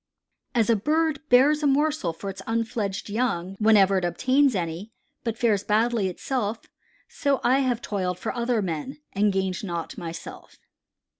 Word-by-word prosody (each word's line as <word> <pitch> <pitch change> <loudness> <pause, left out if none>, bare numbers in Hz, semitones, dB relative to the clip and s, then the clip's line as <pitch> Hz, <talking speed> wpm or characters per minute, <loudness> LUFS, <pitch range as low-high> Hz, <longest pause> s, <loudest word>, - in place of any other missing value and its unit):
"As 230 -1 +3
a - - +4
bird 305 +7 +1
bears 280 +5 +5
a 295 - +2
morsel 290 - +1
for 195 +4 -6
its 195 0 -10
unfledged 225 -3 -2
young 200 -5 -1
whenever 200 -3 +5
it - - -8
obtains 260 - +2
any, 175 +4 -4 0.3
but 230 -2 -3
fares 215 -5 +2
badly 220 -1 +1
itself, 220 +3 -3 0.4
so 280 -2 0
I 255 +3 +4
have 250 -3 0
toiled 185 -3 -2
for 180 - -4
other 235 -2 0
men 175 - -4 0.2
and 205 +1 +2
gained 190 -1 -2
naught 170 -4 -5
myself." 170 -1 -8
220 Hz, 155 wpm, -25 LUFS, 190-255 Hz, 0.4 s, bears